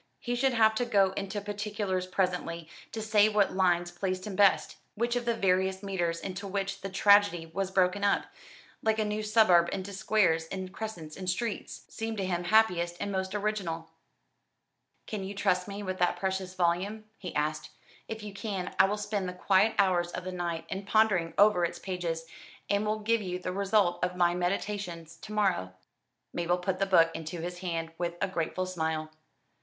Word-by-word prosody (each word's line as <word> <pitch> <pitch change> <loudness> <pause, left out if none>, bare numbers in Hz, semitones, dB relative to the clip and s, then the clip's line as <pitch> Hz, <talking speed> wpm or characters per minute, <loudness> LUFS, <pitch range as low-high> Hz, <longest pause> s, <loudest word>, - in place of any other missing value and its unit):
He 245 - -3
should 260 +2 +2
have 220 -1 +5
to - - +1
go 200 -5 +3
into 195 +1 -4
particulars 205 -2 -2
presently, 180 -3 -1 0.2
to 220 - -4
say 215 -1 +4
what 210 -2 +2
lines 175 -2 +2
pleased 185 +1 -3
him 205 -3 -5
best, 200 0 +3 0.2
which 235 +2 0
of 245 -1 -1
the 235 -1 +1
various 190 -1 +1
meters 175 -4 -1
into 195 +1 -5
which 195 0 -3
the 195 - -4
tragedy 200 -3 +4
was 185 +4 -3
broken 190 +1 +2
up 200 - +2 0.6
like 220 0 +1
a 215 - +1
new 210 +1 -2
suburb 210 -6 +5
into 195 +1 -4
squares 190 -5 +2
and 185 +1 -6
crescents 175 -9 -6
and 185 -1 -4
streets 225 +4 -3
seemed 225 0 -4
to 195 - -1
him 175 -1 -1
happiest 175 -4 +3
and 200 - -2
most 190 +1 -2
original. 200 -6 -2 1.1
"Can 210 -3 -4
you 195 +1 -6
trust 185 -2 +1
me 200 0 -6
with 185 -1 -4
that 180 - +2
precious 190 -1 -2
volume?" 185 +5 0 0.2
he 180 - -7
asked. 150 +1 -1 0.4
"If 220 -1 -6
you 205 -1 -7
can, 200 -2 -4
I - - +8
will 205 +2 -1
spend 205 -2 -2
the - - -6
quiet 195 +4 +3
hours 180 -3 +3
of 180 - -4
the 185 - -4
night 170 -2 -3
in 195 +3 -4
pondering 200 -5 +2
over 205 -3 +5
its 170 - -1
pages, 170 -3 -3 0.5
and 205 +1 +1
will 215 0 -1
give 230 +1 +2
you 180 -2 -3
the 180 0 -4
result 195 -2 +2
of 180 0 0
my 175 -1 +3
meditations 175 -2 -3
to 210 - -10
morrow." 190 - 0 0.6
Mabel 175 +1 +1
put 185 +1 -2
the 195 - +1
book 165 -3 +5
into 165 +1 -5
his 175 +1 -5
hand 165 -3 -3
with 170 -1 -2
a 195 - +1
grateful 185 0 -2
smile. 160 -3 -2
190 Hz, 190 wpm, -29 LUFS, 175-205 Hz, 1.1 s, I